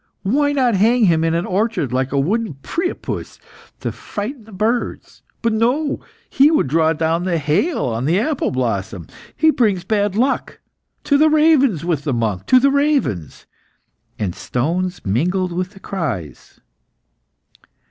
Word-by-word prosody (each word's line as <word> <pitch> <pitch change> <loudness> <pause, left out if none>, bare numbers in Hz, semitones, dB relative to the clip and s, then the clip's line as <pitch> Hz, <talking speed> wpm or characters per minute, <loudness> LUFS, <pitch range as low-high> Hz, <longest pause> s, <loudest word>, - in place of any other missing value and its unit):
Why 285 +8 +2
not 260 -4 +2
hang 225 +5 +3
him 165 -3 +3
in 165 0 +1
an 170 - -1
orchard, 195 - -1
like 130 +1 0
a 140 - +1
wooden 205 +3 -1
Priapus, 350 +1 -4 0.4
to - - -2
frighten 220 +3 -6
the 220 - -15
birds? 220 +5 -2 0.2
But 230 -1 +1
no; 255 +7 +1 0.3
he 280 +2 +4
would 315 - +2
draw 160 +3 +2
down 165 +2 0
the 180 -2 0
hail 160 - 0
on 115 +1 -2
the 170 +6 +2
apple 285 +5 0
blossom. 105 -8 -2 0.3
He 315 0 +4
brings 205 - +1
bad 205 0 0
luck. 255 +5 0 0.4
To 285 -1 +2
the 310 +1 +5
ravens 300 - +3
with 160 -5 -1
the 145 - -1
monk! 110 -6 -2
to 255 - +6
the 275 +2 +3
ravens!" 280 - 0 0.7
and 95 -5 -2
stones 175 - -2
mingled 175 - 0
with 180 +1 -2
the 195 - -16
cries. 135 - -5
190 Hz, 155 wpm, -19 LUFS, 150-250 Hz, 0.7 s, to